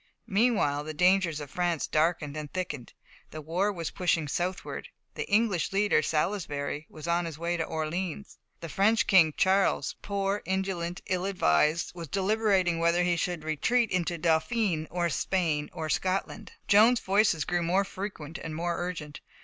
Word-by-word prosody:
Meanwhile 195 -10 +1
the 155 0 -6
dangers 180 -2 +3
of 145 -2 -8
France 175 -3 0
darkened 155 -2 0
and 150 -2 -6
thickened. 150 -9 -5 0.4
The 155 - -8
war 175 +7 0
was 170 -5 -4
pushing 170 -4 0
southward; 180 +6 -3 0.3
the - - -5
English 205 -4 +2
leader, 205 +1 +3
Salisbury, 150 -3 -2
was 155 +1 -9
on 170 +1 +1
his 160 -3 -6
way 170 +2 -1
to 165 - -1
Orleans; 165 +5 -4 0.2
the 165 - -5
French 210 +7 +2
King, 170 -6 +5
Charles, 190 +1 +2
poor, 200 0 -1
indolent, 190 -2 -2
ill 185 -1 -1
advised, 155 - +2
was 170 -2 -7
deliberating 195 -2 +1
whether 170 +1 +3
he 175 0 +2
should 170 -1 -2
retreat 220 +10 +1
into 175 -1 0
Dauphiné, 160 +1 +1
or 175 0 0
Spain, 160 -1 -1
or 160 - -5
Scotland. 185 +5 -2
Joan's 225 +4 +6
voices 195 -5 +2
grew 175 0 0
more 180 +4 +2
frequent 190 -6 -7
and 160 -1 -6
more 170 +1 -1
urgent. 165 -5 -5
175 Hz, 155 wpm, -28 LUFS, 160-195 Hz, 0.4 s, Joan's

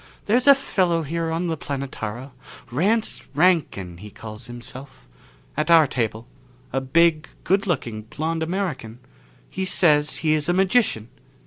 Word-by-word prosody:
"There's 245 +6 +2
a 280 - +10
fellow 180 -10 0
here 165 +2 -2
on 165 +2 -1
the 165 -2 -1
Planetara, 135 -4 -5 0.4
Rance 205 - +1
Rankin, 145 - +1
he 105 +4 -10
calls 110 +1 -9
himself. 130 +3 -8 0.5
At 155 +2 -1
our 165 -2 +7
table 115 -4 -2 0.5
a 135 - 0
big, 160 +3 +3 0.2
good 195 +3 +1
looking 120 - -2
blond 160 +9 -3
American. 160 - -3 0.5
He 190 - -3
says 155 -5 +3
he 155 - +4
is 155 +1 0
a - - +3
magician. 190 - +2
155 Hz, 140 wpm, -23 LUFS, 125-175 Hz, 0.5 s, a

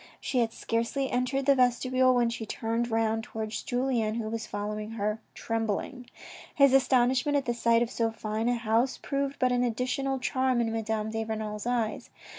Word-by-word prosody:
She 255 - -1
had 230 -2 +1
scarcely 235 +5 -2
entered 255 +2 0
the 280 - +6
vestibule 255 0 +3
when 240 -1 +2
she 230 -1 -5
turned 230 +2 -2
round 225 0 0
towards 220 -1 -4
Julien, 245 -4 0
who 225 -2 -3
was 225 -1 -4
following 210 +1 -4
her 215 0 -2
trembling. 225 +3 -3 0.5
His 275 -3 +5
astonishment 260 +1 +3
at 275 - -1
the 240 - 0
sight 235 0 +3
of 240 - -5
so 230 -1 0
fine 220 +1 -2
a 245 - +2
house 230 +2 +1
proved 275 0 -2
but 255 0 +2
an 245 0 +2
additional 255 +3 -1
charm 260 -1 +1
in 230 -1 0
Madame 220 -1 -2
de 225 0 -2
Renal's 215 0 -4
eyes. 235 -3 -1
235 Hz, 180 wpm, -28 LUFS, 225-255 Hz, 0.5 s, the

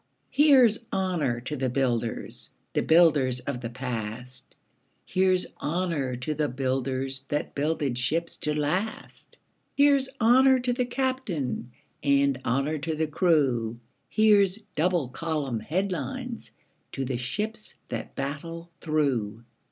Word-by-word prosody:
Here's 260 -7 +5
honour 170 -11 0
to 140 +5 -4
the 130 -2 -1
builders 120 -3 -1
– - - -45
The - - +2
builders 150 -7 +4
of 125 -2 -4
the 115 - -4
past; 125 0 -5 0.5
Here's 185 -1 +3 0.2
honour 155 -6 -1
to 125 +5 -2
the 150 0 0
builders 130 +1 -1
That 145 +3 -2
builded 145 -4 -1
ships 165 +7 0
to 150 0 0
last; 185 +9 -3 0.4
Here's 280 -2 +4
honour 260 +3 +6
to 245 0 +1
the 250 0 0
captain, 245 - -2 0.3
And 140 -2 +2
honour 140 +6 0
to 155 +2 -2
the 160 +1 0
crew; 140 - +1 0.3
Here's 205 -3 +4 0.2
double 170 -3 +1
column 145 -5 -2
headlines 200 - -3 0.4
To 135 - -2
the 125 -1 -2
ships 210 - -2
that - - -5
battle 165 +5 -5
through. 125 -9 0
150 Hz, 125 wpm, -27 LUFS, 130-185 Hz, 0.5 s, honour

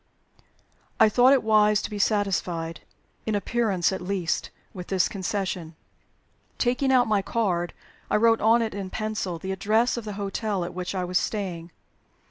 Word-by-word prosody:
I 220 - +7
thought 250 +4 +5
it 275 -2 +4
wise 210 -1 +4
to - - -3
be 205 - -4
satisfied 180 -6 0 0.5
in 215 - +1
appearance 205 -4 +1
at 190 - -4
least 180 -2 -2 0.2
with 180 -1 -8
this 190 -2 +2
concession. 185 -4 -3 0.8
Taking 255 +2 +1
out 250 -2 +4
my 210 -2 +2
card, 185 -6 -1 0.4
I - - +1
wrote 225 +1 +4
on 230 +2 +4
it 220 - -3
in 195 -2 -5
pencil 215 -4 -3
the 190 +3 -5
address 215 +6 +1
of 235 - -5
the 210 - -5
hotel 200 -1 -2
at 175 - -7
which 180 +1 -4
I 185 - -1
was 180 0 +1
staying. 180 -6 -4
200 Hz, 165 wpm, -25 LUFS, 180-220 Hz, 0.8 s, I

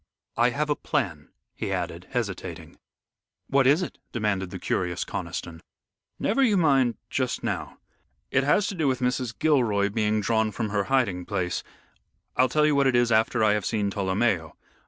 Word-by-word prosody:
I 120 +1 +4
have 150 +5 -1
a - - +2
plan," 90 - -2 0.2
he - - -4
added, - - -3
hesitating. - - -5 0.7
"What 135 -1 +3
is 150 +7 +4
it?" 165 - -7
demanded 105 -5 -1
the 95 - -6
curious 90 0 -2
Conniston. 80 -1 -5 0.6
"Never 225 +7 +1
you 220 -7 +4
mind 135 -8 +3 0.2
just - - -1
now. - - -3 0.5
It 130 - +3
has 170 +8 +3
to - - -4
do 160 -6 0
with 130 -1 +1
Mrs. 125 -2 -1
Gilroy 120 -10 +2
being 105 0 +1
drawn 110 +1 +1
from 110 +1 -3
her 100 -1 0
hiding 110 -10 +1
place. 90 -3 -1 0.7
I'll 130 +1 +4
tell 150 +3 +3
you 150 -1 +3
what 140 -1 +4
it 130 - +2
is 120 -1 +3
after 110 +1 +3
I 105 -1 +4
have 105 -1 -1
seen 105 -3 -1
Tolomeo. 95 -4 0
115 Hz, 175 wpm, -26 LUFS, 100-135 Hz, 0.7 s, I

